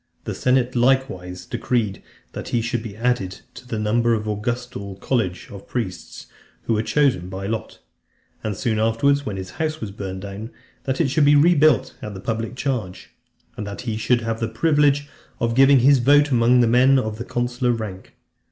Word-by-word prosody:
The - - -4
senate 125 0 +1
likewise 120 -9 0
decreed, 110 -6 -1 0.3
that - - -7
he 120 - 0
should 115 +1 -2
be 110 -3 -8
added 115 -6 -1
to 125 0 -12
the 115 - -3
number 115 +2 +2
of 105 - -3
the 105 - -1
Augustal 105 -3 -5
college 100 -9 -1
of 100 -1 -10
priests, 100 -8 -5 0.4
who 115 - 0
were 110 - +1
chosen 120 -9 +1
by 95 +1 -6
lot; 110 +2 -4 0.7
and 105 -3 -3
soon 110 -3 0
afterwards, 135 +6 +2
when 100 -2 -3
his 95 -1 -6
house 155 0 -1
was 105 -8 -5
burnt 95 -1 -6
down, 100 +3 -7 0.4
that 130 -1 -1
it 160 -5 +2
should 150 0 +3
be 145 +1 +6
rebuilt 150 -3 +4
at 105 -2 -6
the - - -7
public 115 +3 -3
charge; 115 -10 -4 0.4
and 105 -4 -5
that 100 +3 -6
he 115 -3 -3
should 120 +2 +1
have 115 0 -3
the 115 - -1
privilege 145 +3 +2 0.3
of 115 0 0
giving 135 +1 +6
his 135 +1 +5
vote 145 +3 +4
amongst 125 0 +4
the 120 - +3
men 130 +3 +5
of 110 -2 -2
consular 120 0 0
rank. 105 -5 -6
115 Hz, 190 wpm, -22 LUFS, 105-130 Hz, 0.7 s, be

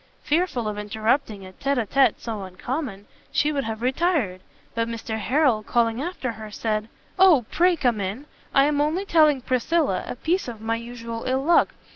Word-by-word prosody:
Fearful 300 -8 0
of 210 -1 -3
interrupting 215 0 -1
a 185 - -10
tete 275 +8 -1
a 235 - +1
tete 270 +5 +3
so 220 -3 -5
uncommon, 200 - -5 0.3
she 300 - +2
would 275 -2 -1
have 225 +1 -4
retired, 260 - 0 0.3
but 230 0 -1
Mr 225 -1 -4
Harrel, 250 0 +2
calling 230 +2 +1
after 300 -6 -3
her, 220 -1 -9
said, 215 0 -2 0.3
"O 340 -11 +6
pray 355 +2 +4
come 240 -8 +1
in! 200 +9 -4 0.3
I 275 - +5
am 290 0 +1
only 320 +7 0
telling 305 -7 +4
Priscilla 255 - 0
a - - -4
piece 340 +7 -1
of 235 -3 -6
my 225 +1 -1
usual 230 -1 -7
ill 260 +1 0
luck. 340 +3 +3
245 Hz, 180 wpm, -24 LUFS, 220-295 Hz, 0.3 s, O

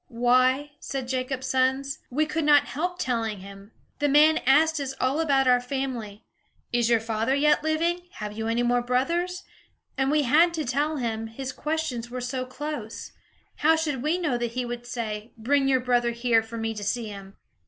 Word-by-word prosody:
"Why," 255 +3 +2
said 265 -2 -5
Jacob's 260 0 -2
sons, 265 +1 0
"we 300 +5 +1
could 310 +1 -2
not 295 -1 +5
help 355 +5 -3
telling 225 - -2
him. 200 +2 -12 0.3
The 290 - +2
man 305 +3 +5
asked 315 +3 +4
us 270 -1 -4
all 265 +4 +1
about 275 -5 +2
our 250 -1 +5
family, 245 -5 -4 0.5
'Is 240 -1 +2
your 230 -1 +4
father 225 +3 -1
yet 295 +1 +3
living? 335 +3 0
Have 210 -1 -6
you 220 0 -3
any 230 +1 +1
more 245 0 +2
brothers?' 340 +10 -1 0.6
And 270 0 +2
we 300 0 +3
had 325 +7 +4
to 310 -2 -2
tell 290 +5 0
him, 225 -3 -2
his 260 +4 -6
questions 300 -6 -3
were 250 +1 -5
so 255 +1 -3
close. 255 -4 -6 0.5
How 320 +2 +4
should 300 -5 -2
we 305 +6 +1
know 300 -9 -1
that 240 -1 -3
he 250 0 -2
would 240 0 -6
say, 220 -2 -5
'Bring 270 +5 +2
your 260 -1 +3
brother 245 -1 +1
here, 235 -1 +2
for 225 +1 -8
me 225 0 -2
to 210 -1 -6
see 220 +2 -2
him'?" 195 -1 -10
255 Hz, 190 wpm, -26 LUFS, 235-295 Hz, 0.6 s, not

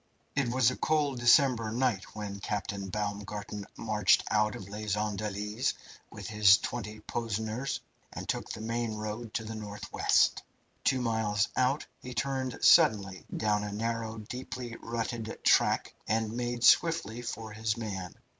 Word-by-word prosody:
It 140 -3 +2
was 130 -1 +4
a - - -4
cold 145 -4 +1
December 120 -2 +5
night 120 -5 -1
when 100 -2 -5
Captain 100 -1 -3
Baumgarten 105 0 -4
marched 105 -3 +3
out 105 0 +2
of 95 - -8
Les 105 0 -2
Andelys 105 +1 -2 0.3
with - - -9
his 105 -2 +6
twenty 105 -1 -5
Poseners, 110 +3 -3 0.3
and - - -7
took - - -2
the 110 - -5
main 115 0 -2
road 110 +2 -5
to 110 - -1
the 110 +1 -6
north 105 -2 -7
west. - - +3 0.4
Two 130 -1 +2
miles 110 -3 +1
out 130 +3 +2 0.2
he 125 -1 -8
turned 130 0 -1
suddenly 100 -3 +5
down 105 -1 +1
a 105 - -4
narrow, 115 +1 -2
deeply 120 +2 -6
rutted 115 -1 -3
track, - - +3
and 110 0 +1
made 120 0 -2
swiftly 165 -9 +4
for 110 -2 -5
his 110 +1 -1
man. 95 -5 -5
110 Hz, 145 wpm, -30 LUFS, 105-120 Hz, 0.4 s, his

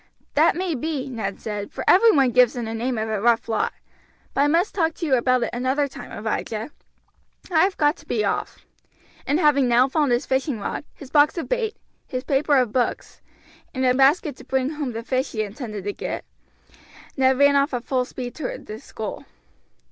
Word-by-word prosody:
"That - - +4
may 360 -1 -1
be," 280 0 -3
Ned 200 -5 -4
said, 210 -2 -5
"for - - -5
every 455 +6 +7
one 270 - +3
gives 250 -1 +5
them 240 -2 -4
the 225 - -4
name 240 +2 -2
of 220 0 -2
a 215 -2 -2
rough 235 0 +2
lot; 220 -2 0 0.6
but - - +1
I 285 - +4
must 335 +7 +2
talk 325 -4 0
to 340 - -4
you 285 - +1
about 255 0 +3
it - - -2
another 260 +4 0
time, 260 - -10
Abijah, 220 +3 -3 0.8
I 325 - +3
have 385 - -3
got 295 +1 +2
to - - -18
be 430 - 0
off;" - - -3 0.6
and 290 +4 +2
having 285 -5 +4
now 245 +2 +4
found 290 -1 +1
his 240 0 +1
fishing 265 -2 -1
rod, 205 - -4
his 270 -3 -12
box 295 +3 +4
of 335 - -3
bait, 470 -4 -1 0.3
his 255 0 -4
paper 280 +1 +2
of 250 -4 +2
books, 245 +1 -2 0.5
and 260 0 0
a 250 - +4
basket 275 +3 +3
to - - -12
bring 265 +1 -1
home 295 -5 -4
the 230 +1 -5
fish 260 +2 -1
he 215 -2 0
intended 210 -1 -6
to 205 +1 -3
get, - - -5 0.9
Ned 265 -1 +3
ran 285 +1 +5
off 280 +2 +3
at 245 -2 -3
full 255 -2 +1
speed 250 -1 -7
toward 295 -5 -6
the 215 +1 -7
school. 220 -2 -7
260 Hz, 210 wpm, -23 LUFS, 235-295 Hz, 0.9 s, every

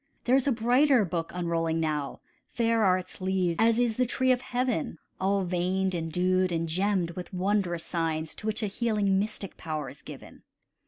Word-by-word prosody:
There 250 - +3
is 270 0 +2
a - - +4
brighter 245 +1 +3
book 165 -2 -3
unrolling 165 -2 -1
now; 150 -3 -2 0.3
Fair 230 -1 +1
are 185 -2 +4
its 185 0 -8
leaves 185 -2 0
as 225 0 +4
is 240 -2 +1
the 250 -1 +2
tree 260 +2 +2
of 250 -1 +2
heaven, 245 -11 -2 0.2
All 195 +1 +1
veined 185 +1 0
and 165 -2 -3
dewed 185 +2 +2
and 165 0 -1
gemmed 185 +1 0
with 180 +1 -8
wondrous 185 -2 0
signs, 160 -2 -2
To 215 - -6
which 220 +1 -1
a - - +2
healing 205 -2 +1
mystic 205 -1 -4
power 155 -5 -4
is 140 - -15
given. - - -11
190 Hz, 190 wpm, -28 LUFS, 170-220 Hz, 0.3 s, a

